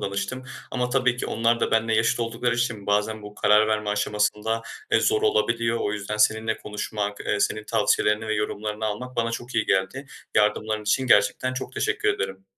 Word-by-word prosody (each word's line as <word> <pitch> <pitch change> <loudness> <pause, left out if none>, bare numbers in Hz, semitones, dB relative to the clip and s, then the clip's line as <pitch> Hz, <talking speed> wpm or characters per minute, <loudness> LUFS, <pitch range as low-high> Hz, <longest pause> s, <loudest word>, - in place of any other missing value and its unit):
danıştım 100 +6 -4 0.3
ama 125 -1 -1
tabii 125 -2 +2
ki - - -3
onlar 115 +1 +1
da - - +1
benle 110 0 +2
yaşıt 110 +2 +2
oldukları 115 +1 -1
için 120 -4 -2
bazen 105 +1 0
bu 105 0 -10
karar 105 +1 +4
verme 105 -1 0
aşamasında, 105 +2 0 0.3
eee, - - +5
zor 430 0 +2
olabiliyor. 115 - +1
O 105 - -1
yüzden 105 0 -4
seninle 110 +1 +2
konuşmak, 105 -1 -4
eee, 100 - -1
senin 110 +1 0
tavsiyelerini 105 0 +1
ve 110 - 0
yorumlarını 105 +1 -3
almak 125 +5 -4
bana 115 -1 +1
çok 120 +2 -6
iyi 110 - +1
geldi. 95 +9 0 0.3
Yardımların 110 0 +1
için 120 +6 +1
gerçekten 130 +1 +3
çok 130 - -5
teşekkür - - 0
ederim. 95 0 -2
110 Hz, 180 wpm, -25 LUFS, 105-115 Hz, 0.3 s, eee